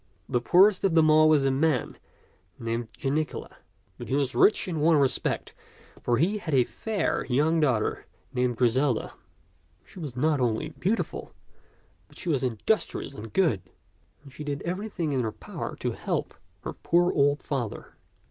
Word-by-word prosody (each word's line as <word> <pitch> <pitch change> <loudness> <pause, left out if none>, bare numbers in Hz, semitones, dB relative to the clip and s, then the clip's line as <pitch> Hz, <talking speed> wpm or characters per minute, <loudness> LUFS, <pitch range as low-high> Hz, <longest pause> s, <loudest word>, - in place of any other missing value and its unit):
The 125 -2 0
poorest 185 - +5
of 190 -4 +2
them 155 -1 +5
all 155 0 +6
was 150 -3 +4
a 135 - +3
man 140 -2 +1 0.6
named 115 0 -3
Jani 145 +3 +1
cula; - - -9 0.4
but - - -7
he 135 - 0
was 140 -2 0
rich 215 - +4
in 165 -4 -2
one 160 +2 +4
respect, 135 -3 0 0.5
for 120 -1 +1
he 190 - +1
had 155 -7 -2
a 130 - +5
fair 210 - -2
young 150 +6 +2
daughter 130 -8 0 0.3
named 125 -2 0
Griselda. 125 +1 +1 0.7
She - - -13
was 145 -7 -6
not 150 +2 +2
only 115 -3 0
beautiful, 210 +6 -3 0.7
but - - -19
she 180 - -5
was 145 -5 +1
industrious 130 - -1
and 110 -3 -9
good, 160 - +2 0.6
and 140 -3 -14
she 150 - -7
did 145 -1 -4
everything 180 -4 -3
in 130 - +1
her 110 -2 -2
power - - -7
to - - -2
help - - -3 0.3
her - - -4
poor 175 +1 +2
old 145 0 +2
father. 125 -7 -4
145 Hz, 165 wpm, -27 LUFS, 125-165 Hz, 0.7 s, all